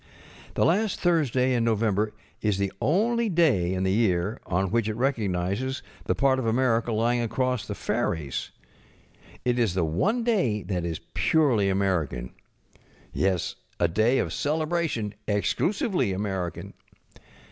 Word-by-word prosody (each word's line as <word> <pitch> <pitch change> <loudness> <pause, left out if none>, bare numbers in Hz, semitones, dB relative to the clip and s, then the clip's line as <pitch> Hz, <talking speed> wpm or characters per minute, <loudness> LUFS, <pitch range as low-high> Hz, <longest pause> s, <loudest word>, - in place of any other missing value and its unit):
The - - +3
last 200 +4 +1
Thursday 135 -7 +2
in 120 -2 +1
November 110 -2 +1 0.3
is 105 -3 +1
the 100 -1 -1
only 225 - +2
day 140 - +3
in 95 - -1
the 95 - +1
year 100 0 +1
on 95 +1 0
which 115 -1 +1
it 110 - -2
recognizes 110 -1 -1 0.2
the - - +1
part 135 -1 +3
of 120 - -2
America 120 0 +2
lying 120 +2 +1
across 125 +1 -1
the - - -4
ferries. 75 -5 -2 1.0
It 125 0 +1
is 110 -7 +1
the 90 -3 +2
one 205 - 0
day 180 - +1
that 90 -4 -2
is 85 -2 -4
purely 130 -11 +3
American. 85 -11 -1 0.8
Yes, 95 -3 0 0.3
a 85 - +4
day 110 +9 +2
of - - -1
celebration, 155 -8 -1
exclusively 175 - 0
American. 95 -3 -3
115 Hz, 135 wpm, -26 LUFS, 95-135 Hz, 1.0 s, a